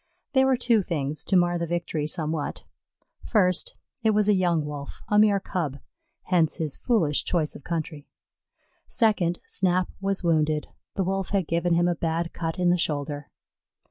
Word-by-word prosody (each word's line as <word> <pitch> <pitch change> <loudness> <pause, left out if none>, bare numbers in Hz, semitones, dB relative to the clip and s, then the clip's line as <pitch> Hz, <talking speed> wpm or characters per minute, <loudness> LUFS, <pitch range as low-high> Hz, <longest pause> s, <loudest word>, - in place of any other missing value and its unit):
There 265 -1 +4
were 265 -1 +3
two 235 -3 +3
things 150 -5 -3
to 195 - +1
mar 175 0 +2
the 170 - -2
victory 165 -3 -2
somewhat: 155 -2 -3 0.6
first, 185 -6 +2 0.3
it 220 -2 +2
was 210 -1 +3
a 210 - +5
young 175 -5 +1
Wolf, 145 -1 -7
a 210 -1 +4
mere 210 -2 +5
Cub, 160 -8 -3 0.5
hence 170 -4 +2
his 155 -4 -2
foolish 155 - +1
choice 160 -4 0
of - - -11
country; 155 -3 -4 0.8
second, 205 -7 +1
Snap 185 -1 +1
was 195 -1 -1
wounded 155 -2 +1 0.3
the 195 - +1
Wolf 195 +1 -2
had 195 -3 +1
given 170 +1 +1
him 175 +1 +3
a 175 - +2
bad 165 +1 -2
cut 165 +1 -3
in 180 -1 +2
the 175 0 +3
shoulder. 145 -2 -2
175 Hz, 170 wpm, -26 LUFS, 155-195 Hz, 0.8 s, a